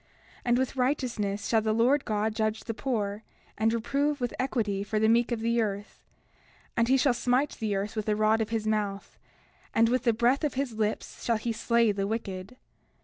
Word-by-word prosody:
30:9 -, -, -36 dB, 0.4 s
And 240 Hz, 0 st, +3 dB
with 260 Hz, +1 st, -1 dB
righteousness 240 Hz, -6 st, -1 dB
shall 225 Hz, -1 st, +3 dB
the 215 Hz, 0 st, 0 dB
Lord 255 Hz, +5 st, +3 dB
God 215 Hz, 0 st, 0 dB
judge 215 Hz, 0 st, -1 dB
the 225 Hz, -, -4 dB
poor, 215 Hz, -4 st, -2 dB, 0.3 s
and 220 Hz, +1 st, +2 dB
reprove 280 Hz, +6 st, 0 dB
with 245 Hz, -2 st, -2 dB
equity 215 Hz, -7 st, -1 dB
for 215 Hz, +1 st, -2 dB
the 220 Hz, +1 st, +3 dB
meek 235 Hz, +2 st, +3 dB
of 235 Hz, -2 st, -1 dB
the 230 Hz, +1 st, +2 dB
earth. 205 Hz, -1 st, -4 dB, 0.7 s
And 235 Hz, 0 st, +2 dB
he 265 Hz, +2 st, +4 dB
shall 260 Hz, 0 st, +3 dB
smite 250 Hz, +4 st, +1 dB
the 215 Hz, -3 st, -1 dB
earth 200 Hz, +3 st, -3 dB
with 215 Hz, -1 st, -2 dB
the 210 Hz, -, +2 dB
rod 215 Hz, +1 st, +3 dB
of 220 Hz, -, -2 dB
his 225 Hz, -1 st, -2 dB
mouth; 210 Hz, -2 st, -2 dB, 0.6 s
and 230 Hz, 0 st, +5 dB
with 255 Hz, 0 st, +2 dB
the 235 Hz, -, +5 dB
breath 240 Hz, +6 st, +2 dB
of 295 Hz, -4 st, -1 dB
his 270 Hz, -3 st, -2 dB
lips 215 Hz, -1 st, -3 dB
shall 230 Hz, -2 st, +1 dB
he 230 Hz, +2 st, -2 dB
slay 230 Hz, 0 st, +2 dB
the 195 Hz, -1 st, -2 dB
wicked. 205 Hz, 0 st, -5 dB
225 Hz, 205 wpm, -28 LUFS, 215-245 Hz, 0.7 s, and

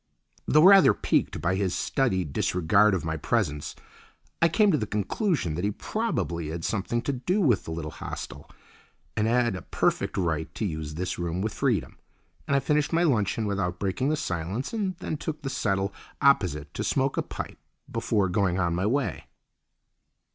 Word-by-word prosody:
Though 155 Hz, +1 st, +5 dB
rather 195 Hz, +1 st, +8 dB
piqued -, -, 0 dB
by 85 Hz, +2 st, +1 dB
his 95 Hz, -2 st, 0 dB
studied 95 Hz, -, 0 dB
disregard 95 Hz, +6 st, +3 dB
of 85 Hz, -, -3 dB
my 80 Hz, 0 st, -2 dB
presence, 75 Hz, -5 st, -1 dB, 0.7 s
I 170 Hz, -, +5 dB
came 210 Hz, +4 st, +4 dB
to 150 Hz, -, +3 dB
the 105 Hz, -, -2 dB
conclusion 105 Hz, -, -1 dB
that 85 Hz, +4 st, -3 dB
he 100 Hz, -, +2 dB
probably 100 Hz, -, -2 dB
had 80 Hz, +1 st, -4 dB
something 110 Hz, +3 st, -1 dB
to 140 Hz, -, -1 dB
do 175 Hz, +11 st, 0 dB
with 125 Hz, -, +2 dB
the -, -, -6 dB
little 80 Hz, -2 st, -4 dB
hostel -, -, -7 dB, 0.7 s
and 105 Hz, -, +1 dB
had 120 Hz, -2 st, +2 dB
a 90 Hz, -, -6 dB
perfect -, -, -1 dB
right 80 Hz, -4 st, -1 dB
to 110 Hz, -, -2 dB
use 75 Hz, -4 st, -4 dB
this 90 Hz, +2 st, -3 dB
room 85 Hz, 0 st, -2 dB
with 105 Hz, +2 st, -2 dB
freedom, 125 Hz, -, -1 dB, 0.5 s
and 140 Hz, -, +2 dB
I -, -, +5 dB
finished 150 Hz, +1 st, +1 dB
my 170 Hz, +1 st, +3 dB
luncheon 110 Hz, -, +1 dB
without 95 Hz, -3 st, -1 dB
breaking 100 Hz, +9 st, -1 dB
the 155 Hz, -, +1 dB
silence 95 Hz, -, -3 dB
and 200 Hz, -5 st, -1 dB
then 155 Hz, -, -4 dB
took 155 Hz, 0 st, -5 dB
the 135 Hz, -, -3 dB
settle 100 Hz, -3 st, 0 dB, 0.3 s
opposite 85 Hz, -, +2 dB
to -, -, -3 dB
smoke 135 Hz, 0 st, +1 dB
a -, -, +1 dB
pipe -, -, -7 dB, 0.3 s
before 100 Hz, -3 st, +1 dB
going 95 Hz, -1 st, +1 dB
on 85 Hz, -3 st, +1 dB
my 90 Hz, +4 st, 0 dB
way. 115 Hz, -, -1 dB
100 Hz, 180 wpm, -27 LUFS, 85-140 Hz, 0.7 s, rather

